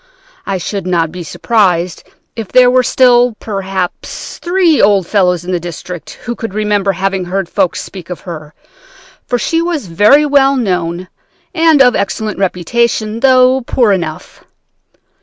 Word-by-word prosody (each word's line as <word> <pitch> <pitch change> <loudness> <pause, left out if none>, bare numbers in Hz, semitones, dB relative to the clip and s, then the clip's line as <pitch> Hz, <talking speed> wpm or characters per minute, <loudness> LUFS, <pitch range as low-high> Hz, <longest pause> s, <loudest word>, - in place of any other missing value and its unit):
I 195 - -1
should 190 +1 -5
not 165 -3 0
be 180 +1 -7
surprised 180 -1 0 0.3
if 225 -3 -5
there 250 +2 +5
were 255 0 +4
still, 245 -1 +3
perhaps, 195 -3 -5
three 350 -3 +2
old 200 -2 +3
fellows 180 -3 +1
in 185 - -4
the 180 - 0
district 175 0 -8
who 240 - -3
could 225 -4 -7
remember 205 -2 0
having 190 0 -2
heard 190 +1 -2
folks 175 - -1
speak 180 -3 -11
of 180 - -6
her, 155 -3 -9 0.7
for 245 - 0
she 330 +7 0
was 335 -7 -2
very 210 - +4
well 275 -1 +3
known 180 -6 -2 0.5
and 325 -5 +4
of 245 -2 +3
excellent 210 +1 -3
reputation, 215 +4 -1
though 255 0 +4
poor 235 -2 +1
enough. 170 -5 -4
200 Hz, 150 wpm, -13 LUFS, 180-250 Hz, 0.7 s, there